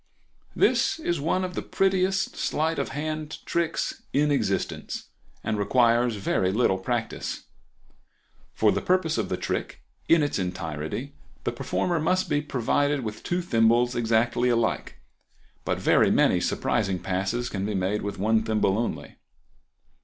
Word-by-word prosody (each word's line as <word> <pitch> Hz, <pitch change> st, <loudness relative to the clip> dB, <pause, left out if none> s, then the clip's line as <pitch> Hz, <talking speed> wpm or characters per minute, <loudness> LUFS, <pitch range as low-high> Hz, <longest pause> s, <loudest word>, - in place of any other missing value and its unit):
—This -, -, +3 dB
is 175 Hz, -, -2 dB
one 175 Hz, +5 st, +1 dB
of 180 Hz, 0 st, -3 dB
the -, -, -3 dB
prettiest 190 Hz, 0 st, +1 dB
sleight 160 Hz, 0 st, 0 dB
of 140 Hz, -, -2 dB
hand 155 Hz, +2 st, -4 dB
tricks 170 Hz, -1 st, -1 dB
in 145 Hz, +2 st, +3 dB
existence, 140 Hz, -, -2 dB, 0.3 s
and 110 Hz, -1 st, -1 dB
requires 120 Hz, +2 st, +3 dB
very 95 Hz, -2 st, 0 dB
little 95 Hz, -3 st, +2 dB
practice. 110 Hz, +2 st, -3 dB, 1.1 s
For -, -, +4 dB
the -, -, -1 dB
purpose 180 Hz, -7 st, +1 dB
of 105 Hz, -, -2 dB
the -, -, -1 dB
trick, -, -, -4 dB, 0.3 s
in 165 Hz, -2 st, +6 dB
its 145 Hz, -, -1 dB
entirety, 90 Hz, -, -4 dB, 0.3 s
the -, -, 0 dB
performer 175 Hz, -2 st, -1 dB
must 185 Hz, +4 st, +1 dB
be 145 Hz, -, +2 dB
provided 145 Hz, +1 st, 0 dB
with 110 Hz, -1 st, -5 dB
two 175 Hz, +1 st, -1 dB
thimbles 120 Hz, -3 st, +3 dB
exactly 120 Hz, +1 st, +2 dB
alike; 115 Hz, -1 st, 0 dB, 0.7 s
but -, -, 0 dB
very -, -, +4 dB
many -, -, +3 dB
surprising 95 Hz, -1 st, 0 dB
passes 95 Hz, +7 st, -2 dB
can 100 Hz, -5 st, -3 dB
be 105 Hz, 0 st, -2 dB
made 95 Hz, +3 st, 0 dB
with 100 Hz, 0 st, -4 dB
one 110 Hz, +3 st, +2 dB
thimble 105 Hz, -2 st, +1 dB
only. 120 Hz, -, -4 dB
120 Hz, 145 wpm, -26 LUFS, 105-155 Hz, 1.1 s, in